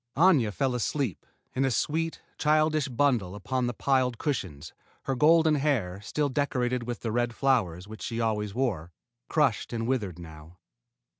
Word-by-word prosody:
Aña 150 - +5
fell 130 +4 0
asleep, 125 - -2 0.3
in 130 - 0
a 135 - +2
sweet, 160 +7 -1 0.2
childish 155 -1 +2
bundle 120 -8 +1
upon 125 +5 -2
the 120 - -2
piled 130 -2 +1
cushions, 90 - -3 0.3
her 135 - -1
golden 160 +4 +5
hair, 125 -11 0
still 145 +7 -1
decorated 125 -3 -1
with 120 -1 -4
the 115 - -2
red 120 +1 0
flowers 100 -10 +1
which 110 0 -10
she 115 -1 -3
always 105 -3 -1
wore, 100 -11 -1 0.4
crushed - - +1
and 115 -1 -2
withered 110 -9 -1
now. 80 0 -12
125 Hz, 155 wpm, -28 LUFS, 105-140 Hz, 0.4 s, Aña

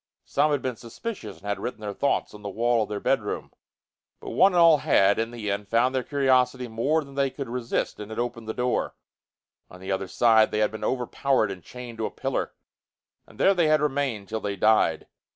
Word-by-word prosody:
Some 145 +2 +2
had 145 -2 0
been 125 -3 -3
suspicious 155 - -7
and - - -17
had 100 -1 -2
written 120 - -5
their 105 -1 -4
thoughts 140 - 0
on 105 - -11
the 100 - -5
wall 115 +3 +1
of 105 - -2
their 105 -1 -3
bedroom. - - -1 0.7
But - - -7
one 185 +11 +4
and 175 - +3
all 165 -2 +7
had, 100 -4 +3
in 115 0 -1
the 115 -4 -4
end, 100 0 -3
found 120 +4 +2
their 130 - +1
curiosity 130 -2 +1
more 135 +8 0
than 140 -1 -14
they 140 0 +1
could 135 +1 -6
resist 120 0 -2
and 105 0 -7
had 110 - -7
opened 120 -2 -3
the 110 - -3
door. 125 0 -1 0.7
On 90 - -13
the 95 +1 -5
other 95 0 -1
side 110 -1 +4
they - - -2
had 105 -1 +2
been 110 - -7
overpowered 130 -3 0
and 95 -2 -8
chained 120 +4 -10
to 110 - 0
a - - -6
pillar, - - -3 0.8
and - - -18
there 195 - +5
they 175 -4 +2
had 155 0 +4
remained 135 -8 -1
till 110 +1 -4
they 100 -1 -3
died. 110 +3 +3
120 Hz, 225 wpm, -25 LUFS, 105-135 Hz, 0.8 s, all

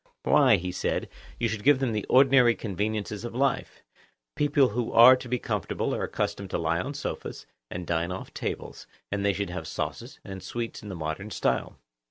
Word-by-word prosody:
Why, - - +5
he 90 +1 -3
said, 90 - -2 0.3
you 120 - +2
should 110 -1 -4
give 145 0 +6
them 130 -3 0
the 105 -2 -3
ordinary 130 -3 +6
conveniences 105 +1 -3
of 120 0 -6
life. 135 +1 -1 0.5
People 145 -2 +3
who 115 +2 -2
are 120 +3 +9
to 125 -1 -8
be 125 - +1
comfortable 105 -5 -2
are - - -2
accustomed 100 -1 -3
to - - -1
lie 85 +1 0
on 140 +6 -5
sofas, - - -5 0.2
and 90 0 -5
dine 85 +1 -1
off 95 - -7
tables, - - -5 0.2
and 100 0 -1
they 100 0 +3
should 100 -1 -3
have 90 - -5
sauces - - -5
and 95 -1 -7
sweets 115 +5 -5
in 105 - -9
the 95 - -5
modern 80 +5 -4
style. - - -1
105 Hz, 195 wpm, -27 LUFS, 95-125 Hz, 0.5 s, are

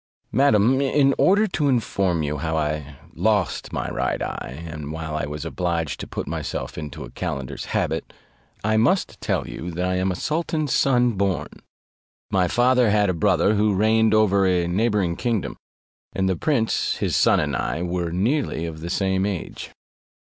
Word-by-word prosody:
Madam, 130 0 +4
in 140 0 +3
order 205 +3 +5
to 165 -7 -1
inform 95 - +1
you 75 +1 -2
how 80 +1 -1
I 75 -2 -3 0.2
lost 105 -4 0
my - - -3
right - - -1
eye, 70 +7 -5
and 75 -2 -6
why 80 0 -5
I 75 -2 -3
was 75 +2 -6
obliged 85 -2 -2
to - - -6
put - - -4
myself - - -4
into 75 -1 -6
a - - -10
calender's 70 -2 -4
habit, - - -2 0.5
I 110 +1 +2
must 125 - +1
tell - - -1
you, 85 - -6
that 90 +1 -2
I 90 0 0
am 95 +1 +1
a - - -3
sultan's 155 - -1
son 125 -2 +3
born: 100 -4 -1 0.8
my 95 -2 +3
father 125 +3 +3
had 105 -2 +3
a - - -2
brother 95 +4 +2
who 105 -1 +2
reigned 110 +2 +3
over 100 -3 +4
a 90 -2 +2
neighbouring 95 -2 +1
kingdom; 115 -6 -1 0.6
and 95 0 0
the 95 - +1
prince 115 - 0
his - - -1
son - - +4
and - - -1
I 85 - -2
were 90 -1 -2
nearly 105 - 0
of 80 -1 -7
the 85 - -5
same 95 0 0
age. 95 -5 -5
95 Hz, 175 wpm, -23 LUFS, 85-115 Hz, 0.8 s, order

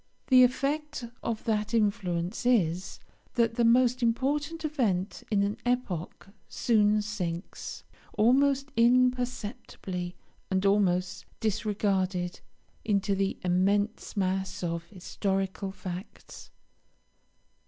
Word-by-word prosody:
The 255 -1 +8
effect 275 +2 0 0.2
of 225 -2 -3
that 215 0 0
influence 200 -4 0
is, 190 -8 +1 0.4
that 230 -1 +2
the 235 - +1
most 250 +2 +4
important 290 +7 0
event 205 - -1
of 200 -1 +3
an 205 +2 -1
epoch 205 -8 -2 0.2
soon 210 -2 +2
sinks, 180 -4 -5 0.3
almost 275 +5 +3
imperceptibly 240 -7 0 0.3
and 190 +1 0
almost 185 -2 +1
disregarded, 195 -4 -1 0.4
into 200 -2 +1
the 195 0 0
immense 200 +5 +1
mass 190 -1 -1
of 170 -1 -2
historical 195 +1 -3
facts. 185 +1 -9
210 Hz, 95 wpm, -28 LUFS, 190-245 Hz, 0.4 s, The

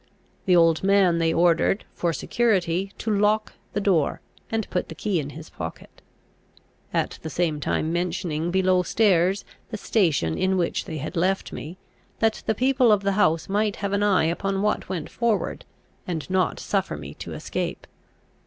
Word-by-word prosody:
The 180 - +5
old 165 -1 +4
man 190 -3 +4
they 165 -1 +2
ordered, 170 +4 +2
for 170 - 0
security, 195 -2 0
to 215 -2 -1
lock 210 +1 +2 0.2
the - - 0
door, 185 -8 +1 0.3
and 225 -2 -1
put 180 - -1
the 160 - -7
key 200 -2 0
in 145 -2 -4
his 155 +2 -10
pocket; 80 -1 -8 0.9
at - - -1
the 160 - -5
same 160 -3 0
time 155 +2 -1
mentioning 175 -2 -1
below 185 0 +3
stairs 190 -1 +2 0.2
the 220 - -4
station 160 - +1
in 190 0 +2
which 175 -2 -1
they 160 - -5
had 155 +5 -5
left 185 +3 0
me, 165 +5 -7 0.4
that 225 -1 +1
the 220 - +2
people 255 0 +3
of 205 -1 +3
the 200 - +2
house 165 -5 +2
might 205 +1 0
have 200 -1 -3
an 200 - +1
eye 200 -5 +3
upon 195 +4 -1
what 210 -3 0
went 175 -5 -3
forward, 230 -4 -1 0.4
and 165 -4 -3
not 185 -1 +1
suffer - - -1
me - - -8
to - - -8
escape. - - -4
185 Hz, 170 wpm, -24 LUFS, 165-205 Hz, 0.9 s, The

